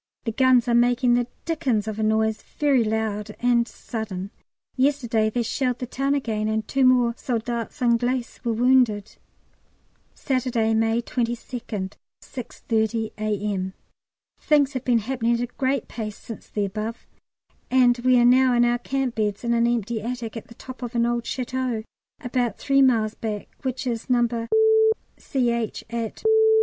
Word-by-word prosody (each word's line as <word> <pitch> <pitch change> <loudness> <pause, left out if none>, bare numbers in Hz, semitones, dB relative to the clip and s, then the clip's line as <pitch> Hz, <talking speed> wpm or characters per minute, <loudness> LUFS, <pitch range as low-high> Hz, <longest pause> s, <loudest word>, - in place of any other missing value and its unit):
The 225 - -2
guns 255 0 +4
are 240 - +2
making 245 +1 +3
the 240 0 +2 0.2
dickens 255 -10 0
of 215 0 -4
a - - 0
noise, 220 0 +1
very 280 -5 +1
loud 215 -1 -2
and 240 -1 +2
sudden. 200 -6 -6 0.4
Yesterday 250 -5 +1
they 240 +2 -1
shelled 250 +1 -1
the 250 - -4
town 275 +3 -1
again, 220 -6 -1
and 220 0 -1
two 270 0 +1
more 250 -2 +4
soldats 235 +1 -3
anglais 245 +1 +2 0.2
were 235 - 0
wounded. 235 -3 +2 1.0
Saturday, 245 -4 0
May 225 +1 +1
22nd, 230 -5 -3 0.3
6.30 225 -3 -2
A.M. 205 -3 -2 0.7
Things 295 -2 +3
have 255 -1 -3
been 245 -3 +3
happening 235 +1 0
at 235 - -2
a - - 0
great 260 +2 -2
pace 215 -3 -6
since 225 - -10
the 205 -1 -1
above, 215 +4 -5 0.6
and 250 -1 +4
we 255 +1 +4
are 240 - +5
now 255 0 +5
in 240 0 +4
our 240 0 +1
camp 270 -1 -2
beds 210 -2 -2
in 235 0 +1
an 235 0 +3
empty 235 -1 -1
attic 235 0 -5
at 225 - -7
the 230 - -14
top 255 +1 -10
of 245 0 -5
an 235 0 +3
old 240 -1 -1
château 255 -3 -2 0.4
about 245 -4 -1
three 275 -1 +2
miles 225 -5 +3
back, 215 -3 -5
which 260 -1 -3
is 235 -1 -3
No. 235 -2 +1 0.7
C.H., 235 -5 -1
at 230 -2 -4
235 Hz, 160 wpm, -24 LUFS, 220-255 Hz, 1.0 s, are